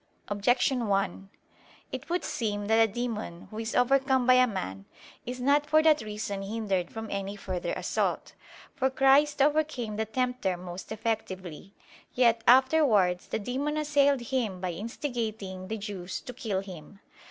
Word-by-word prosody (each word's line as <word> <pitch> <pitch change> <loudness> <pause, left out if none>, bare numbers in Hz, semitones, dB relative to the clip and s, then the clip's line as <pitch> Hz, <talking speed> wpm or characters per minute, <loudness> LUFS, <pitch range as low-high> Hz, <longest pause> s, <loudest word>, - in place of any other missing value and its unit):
Objection 245 +4 +1
1: 195 -1 -1 0.6
It - - -6
would 355 +1 0
seem 205 -3 -2
that 220 +2 +4
a 220 - 0
demon 220 -7 -4
who 215 - -6
is 225 0 -4
overcome 265 0 +3
by 255 - +6
a 255 0 +5
man, 95 - -5 0.4
is 250 +1 -4
not 285 +3 +2
for 310 +1 +4
that 310 -2 +5
reason 210 -2 -4
hindered 195 -3 -2
from 225 0 -6
any 200 0 -3
further 185 -3 -4
assault. - - -2 0.4
For 265 - +1
Christ 270 +2 +4
overcame 290 -8 0
the 220 - 0
tempter 245 -5 -1
most 180 +2 -8
effectively. 195 -5 -4 0.4
Yet 235 -2 +3
afterwards 245 - +4
the - - -2
demon 270 +8 -2
assailed 285 -3 +3
Him 235 -6 -2
by 180 -1 -2
instigating 215 - -4
the 220 - -3
Jews 200 -4 -5
to 250 - -8
kill 215 -6 -2
Him. 190 -1 -11
225 Hz, 155 wpm, -28 LUFS, 195-260 Hz, 0.6 s, by